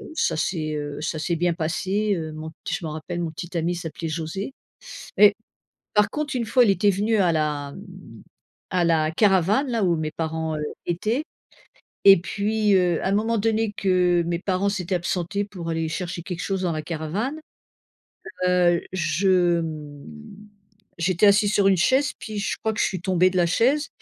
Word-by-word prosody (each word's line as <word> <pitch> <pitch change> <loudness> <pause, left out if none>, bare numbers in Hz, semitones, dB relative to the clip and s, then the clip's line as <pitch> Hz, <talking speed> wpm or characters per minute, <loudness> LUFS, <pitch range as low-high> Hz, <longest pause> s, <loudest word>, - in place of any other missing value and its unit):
ça - - +1
c'est, 155 -1 -2
heu, 145 -1 -5
ça 155 0 -3
c'est 170 +2 -1
bien 175 +1 +1
passé, 190 +6 -1
heu, 160 -2 -4
mon 155 +1 -7 0.2
je - - -2
me - - -3
rappelle, 160 +3 -5
mon 165 -2 -3
petit 175 +3 -8
ami 170 +2 0
s'appelait 165 -1 -5
José. 165 - -4 0.6
Mais 205 -1 +7 0.6
par 210 0 +4
contre, 300 -2 -3
une 240 -2 -1
fois 250 +3 +4
il - - +3
était 205 +1 +3
venu 210 +4 +1
à 185 -4 +3
la 150 -3 -1
m 185 - -13 0.5
à 180 -1 +2
la 160 -2 +2
caravane, 200 - +2
là 230 -3 -1
où 175 -3 +2
mes 155 -1 -3
parents, 160 0 -3
heu, 150 - -4 0.2
étaient, 215 - -1 0.8
et 195 -1 +10
puis 210 +2 +1
heu, 180 -3 +2
à - - 0
un - - 0
moment 220 +3 +1
donné 220 0 +1
que 180 -3 +2
mes 170 0 0
parents 190 +1 0
s'étaient 190 -2 -3
absentés 180 +3 -2
pour 180 -5 -7
aller 165 0 -1
chercher 175 +2 -4
quelque 175 0 -6
chose 195 -1 -2
dans 180 -2 0
la 155 -1 -3
caravane, 175 - -3 1.1
heu, 175 -1 +3
je, 175 0 +2
mmh, 150 -3 -7 0.9
j'étais 175 +3 +1
assise 205 +1 +4
sur 200 -1 +4
une 190 -2 +3
chaise, 260 - +2
puis 215 -1 -6
je 205 - -2
crois 220 0 -2
que 225 - -3
je - - +4
suis 185 -3 -3
tombée 185 0 +2
de 185 - -1
la 175 - +4
chaise, 265 - +2
180 Hz, 185 wpm, -24 LUFS, 165-205 Hz, 1.1 s, et